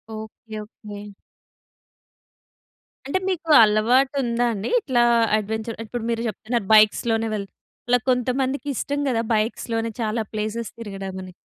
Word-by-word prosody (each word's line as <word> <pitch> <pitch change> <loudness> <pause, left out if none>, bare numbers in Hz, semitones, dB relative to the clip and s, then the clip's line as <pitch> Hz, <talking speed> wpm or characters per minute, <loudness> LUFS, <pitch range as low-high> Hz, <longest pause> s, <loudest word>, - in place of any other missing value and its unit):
Okay. 220 0 -9
Okay. 210 -1 -10 2.0
అంటే 280 +8 0
మీకు 335 -3 -3
అలవాటు 240 +6 +3
ఉందా 240 0 0
అండి? 205 0 -4
ఇట్లా 255 - +2 0.3
అడ్వెంచర్ 220 +2 -4
ఇప్పుడు 235 +1 -5
మీరు 230 -1 -1
చెప్తున్నారు 225 0 -3
బైక్స్‌లోనే 225 +1 +4
వెళ్ 205 -2 -2 0.4
ఇలా 245 0 +5
కొంతమందికిష్టం 265 +3 -1
కదా 230 -3 +1
బైక్స్‌లోనే 225 +1 -1
చాలా 220 +1 0
ప్లేసెస్ 215 +2 -3
తిరగడం 195 -4 -6
అని. 185 0 -11
225 Hz, 115 wpm, -23 LUFS, 215-245 Hz, 2.0 s, ఇలా